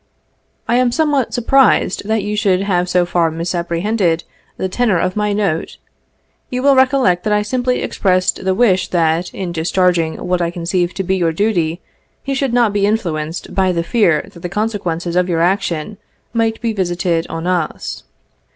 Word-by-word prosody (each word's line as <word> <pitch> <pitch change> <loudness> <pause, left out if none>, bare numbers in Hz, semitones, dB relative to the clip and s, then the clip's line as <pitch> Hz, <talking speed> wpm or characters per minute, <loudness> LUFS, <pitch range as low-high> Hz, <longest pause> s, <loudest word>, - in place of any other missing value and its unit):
I 235 - +2
am 250 -1 +2
somewhat 290 -3 +1
surprised 245 -5 +2
that 220 -2 0
you 210 +1 -2
should 195 -3 +2
have 180 -3 0
so 180 -1 +2
far 175 -1 +1
misapprehended 170 +2 -1 0.3
the 190 - -1
tenor 210 0 +1
of 185 +2 -1
my 210 0 0
note. 195 -6 -1 0.7
You 250 0 -3
will 280 -1 +5
recollect 255 -9 +3
that 210 - +1
I 210 0 +2
simply 250 +3 -1
expressed 185 -1 0
the 190 0 +1
wish 195 -5 +3
that, 170 0 0
in 185 -3 -5
discharg 180 +2 +2
ing 160 -1 -2
what 180 0 0
I 170 - 0
conceived 175 +1 -2
to 190 - -1
be 190 +1 0
your 170 -3 +1
duty, 175 -4 0 0.4
you 275 - -1
should 270 -2 0
not 235 -3 +2
be 200 -1 +2
influenced 165 -7 -2
by 190 -1 +2
the 170 -1 -1
fear 170 -6 +2
that 170 - -12
the 180 - -5
consequences 180 -5 -2
of 180 0 +2
your 165 -2 +1
action 180 +1 -1 0.3
might 225 -1 0
be 230 -1 -1
visited 175 -3 -1
on 165 +1 -5
us. 175 -3 -2
185 Hz, 180 wpm, -17 LUFS, 170-215 Hz, 0.7 s, will